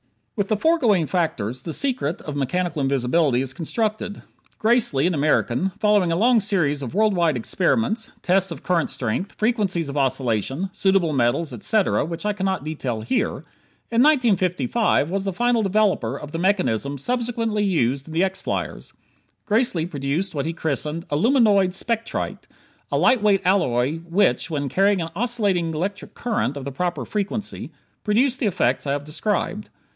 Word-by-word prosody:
With 205 Hz, -3 st, -1 dB
the 215 Hz, -, +1 dB
foregoing 230 Hz, -, +3 dB
factors, 130 Hz, -, -2 dB
the 165 Hz, -, -5 dB
secret 245 Hz, -, -1 dB
of 150 Hz, -, -6 dB
mechanical 160 Hz, +4 st, -1 dB
invisibility 135 Hz, +1 st, +2 dB
is 135 Hz, 0 st, -4 dB
constructed. 215 Hz, -, -3 dB, 0.3 s
Gracely, 215 Hz, -, +2 dB
an 180 Hz, -, +2 dB
American 150 Hz, +1 st, +1 dB
following 205 Hz, -5 st, +3 dB
a -, -, +1 dB
long 235 Hz, +5 st, +4 dB
series 175 Hz, -9 st, 0 dB
of 135 Hz, +4 st, -6 dB
world 215 Hz, 0 st, +3 dB
wide 170 Hz, -6 st, +2 dB
experiments, 220 Hz, -, 0 dB
tests 190 Hz, +1 st, +2 dB
of 165 Hz, -, -7 dB
current 175 Hz, -3 st, +1 dB
strength, 135 Hz, -, -3 dB
frequencies 200 Hz, -8 st, 0 dB
of 140 Hz, -, -6 dB
oscillation, 135 Hz, -, 0 dB
suitable 190 Hz, -5 st, +2 dB
metals, 130 Hz, +5 st, +1 dB
etc., 215 Hz, -1 st, +1 dB
which 165 Hz, +5 st, -5 dB
I 210 Hz, -, +1 dB
cannot 190 Hz, -5 st, -2 dB
detail 135 Hz, -7 st, -3 dB
here 110 Hz, -, -1 dB, 0.5 s
in 230 Hz, +1 st, +3 dB
1955 205 Hz, -, +2 dB
was 195 Hz, 0 st, -1 dB
the 195 Hz, -, -1 dB
final 240 Hz, +3 st, +2 dB
developer 195 Hz, -, +1 dB
of 150 Hz, 0 st, -9 dB
the 165 Hz, -, -4 dB
mechanisms 140 Hz, -, 0 dB
subsequently 230 Hz, -3 st, -1 dB
used 140 Hz, -, 0 dB
in 160 Hz, -, -9 dB
the 170 Hz, -, +3 dB
X 190 Hz, 0 st, -2 dB
flyers. -, -, -4 dB, 0.5 s
Gracely 210 Hz, -7 st, +1 dB
produced 150 Hz, +3 st, -2 dB
what 145 Hz, 0 st, -2 dB
he 165 Hz, -, -2 dB
christened 160 Hz, +1 st, -3 dB
"aluminoid 200 Hz, -, +3 dB
spectrite" 230 Hz, +3 st, -3 dB, 0.4 s
a -, -, +1 dB
light 255 Hz, -3 st, +4 dB
weight 205 Hz, -2 st, +3 dB
alloy 150 Hz, -7 st, +2 dB
which, 175 Hz, +3 st, +1 dB
when 145 Hz, -3 st, -2 dB
carrying 195 Hz, +7 st, +2 dB
an 165 Hz, -, -6 dB
oscillating 205 Hz, -7 st, 0 dB
electronic 185 Hz, +6 st, -4 dB
current 215 Hz, -, -1 dB
of 135 Hz, -, -6 dB
the 140 Hz, -, -4 dB
proper 165 Hz, -2 st, -2 dB
frequency, 210 Hz, 0 st, -4 dB, 0.3 s
produced 245 Hz, +5 st, +2 dB
the 235 Hz, -, +1 dB
effects 140 Hz, -7 st, 0 dB
I 140 Hz, -, +1 dB
have 145 Hz, 0 st, -3 dB
described. 205 Hz, +5 st, -2 dB
180 Hz, 160 wpm, -22 LUFS, 145-210 Hz, 0.5 s, long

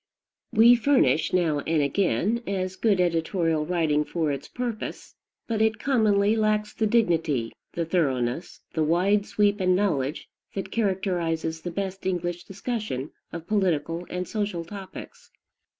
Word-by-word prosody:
We 230 Hz, +3 st, +7 dB
furnish, 250 Hz, -, +3 dB
now 165 Hz, -5 st, +2 dB
and 160 Hz, +2 st, 0 dB
again, 195 Hz, -, +1 dB
as 190 Hz, -1 st, -2 dB
good 205 Hz, -3 st, +2 dB
editorial 165 Hz, -2 st, +1 dB
writing 160 Hz, -4 st, +2 dB
for 160 Hz, -1 st, -1 dB
its 140 Hz, -1 st, -5 dB
purpose; 240 Hz, -3 st, -5 dB, 0.3 s
but 225 Hz, -2 st, -1 dB
it 220 Hz, 0 st, +2 dB
commonly 215 Hz, -5 st, +3 dB
lacks 215 Hz, -1 st, +1 dB
the 220 Hz, -, 0 dB
dignity, 165 Hz, -, +1 dB, 0.2 s
the 170 Hz, -, -1 dB
thoroughness, 135 Hz, -4 st, -1 dB
the 160 Hz, -, +1 dB
wide 190 Hz, +6 st, +2 dB
sweep 205 Hz, 0 st, +2 dB
and 185 Hz, -1 st, +3 dB
knowledge, 155 Hz, -8 st, 0 dB, 0.3 s
that 195 Hz, 0 st, -4 dB
characterizes 175 Hz, -6 st, -1 dB
the 175 Hz, -, -4 dB
best 190 Hz, +1 st, -4 dB
English 175 Hz, -1 st, -2 dB
discussion 200 Hz, -, -4 dB, 0.2 s
of 170 Hz, -1 st, -7 dB
political 175 Hz, -4 st, 0 dB
and 180 Hz, 0 st, -3 dB
social 205 Hz, -6 st, -2 dB
topics. 205 Hz, -, -10 dB
185 Hz, 135 wpm, -26 LUFS, 165-210 Hz, 0.3 s, We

